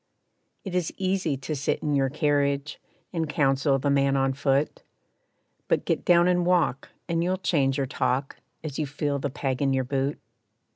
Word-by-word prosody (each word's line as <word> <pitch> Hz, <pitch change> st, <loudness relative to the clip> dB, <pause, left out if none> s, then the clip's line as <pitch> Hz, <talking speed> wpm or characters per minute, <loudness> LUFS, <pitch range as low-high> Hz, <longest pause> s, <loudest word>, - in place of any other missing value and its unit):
It 190 Hz, -, -5 dB
is 180 Hz, -3 st, 0 dB
easy 185 Hz, -6 st, 0 dB
to 145 Hz, +3 st, -4 dB
sit 140 Hz, 0 st, -1 dB
in 150 Hz, -, 0 dB
your 135 Hz, -1 st, +2 dB
carriage, 145 Hz, 0 st, 0 dB, 0.3 s
And 165 Hz, -3 st, -1 dB
counsel 135 Hz, -1 st, +2 dB
the 140 Hz, +1 st, 0 dB
man 140 Hz, 0 st, +3 dB
on 135 Hz, 0 st, +1 dB
foot, 140 Hz, +1 st, 0 dB, 0.9 s
But -, -, +1 dB
get -, -, 0 dB
down 175 Hz, 0 st, +5 dB
and 180 Hz, -1 st, +2 dB
walk, 175 Hz, -6 st, +1 dB, 0.2 s
and 170 Hz, -1 st, 0 dB
you'll 185 Hz, +2 st, 0 dB
change 140 Hz, -7 st, +1 dB
your 140 Hz, -, 0 dB
talk, 135 Hz, +1 st, -1 dB, 0.3 s
As 150 Hz, -3 st, -5 dB
you 150 Hz, -, -1 dB
feel 145 Hz, +1 st, -2 dB
the 140 Hz, -, -2 dB
peg 135 Hz, -1 st, -3 dB
in 135 Hz, -1 st, +2 dB
your 130 Hz, 0 st, +1 dB
boot. 135 Hz, +2 st, -1 dB
140 Hz, 180 wpm, -26 LUFS, 135-160 Hz, 0.9 s, down